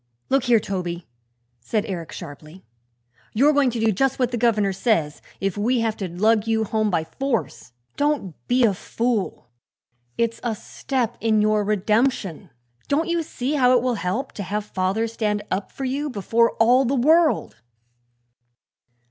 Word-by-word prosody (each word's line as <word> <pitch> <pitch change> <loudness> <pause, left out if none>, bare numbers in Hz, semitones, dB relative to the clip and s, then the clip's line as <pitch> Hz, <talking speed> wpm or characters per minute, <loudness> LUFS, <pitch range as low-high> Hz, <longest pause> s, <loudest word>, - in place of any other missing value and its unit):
"Look 270 -1 +3
here, 240 -2 +5
Toby," 180 -4 -4 0.5
said 210 - -2
Eric 170 -5 -5
sharply, 155 +2 -10 0.7
"you're 280 +7 +4
going 285 -3 +3
to 235 -1 -3
do 225 0 +3
just 270 +6 +1
what 250 -2 0
the - - -1
governor 215 -4 +2
says, 185 -8 0 0.2
if 195 +1 -2
we 240 +3 +1
have 225 -1 0
to 195 - -3
lug 215 +5 +2
you 220 0 +1
home 215 0 0
by 170 -4 0
force. 235 - -3 0.2
Don't 290 - 0
be 250 +1 +3
a 215 -4 +4
fool; 225 - -2 0.7
it's 230 0 0
a 235 -2 -2
step 240 +2 -3
in 220 -1 +2
your 210 0 +2
redemption. 210 - 0 0.4
Don't 315 +5 0
you 340 0 +1
see 275 -3 -3
how 255 -3 +4
it 240 - -1
will 255 -1 +1
help, 200 +4 -2
to - - -7
have 205 +2 -3
father 195 +2 -1
stand 210 -2 -2
up 190 +2 -2
for 270 - -5
you 280 +3 -2
before 230 +1 +1
all 245 +4 +4
the 270 +2 0
world!" 310 - +3
225 Hz, 165 wpm, -23 LUFS, 200-255 Hz, 0.7 s, here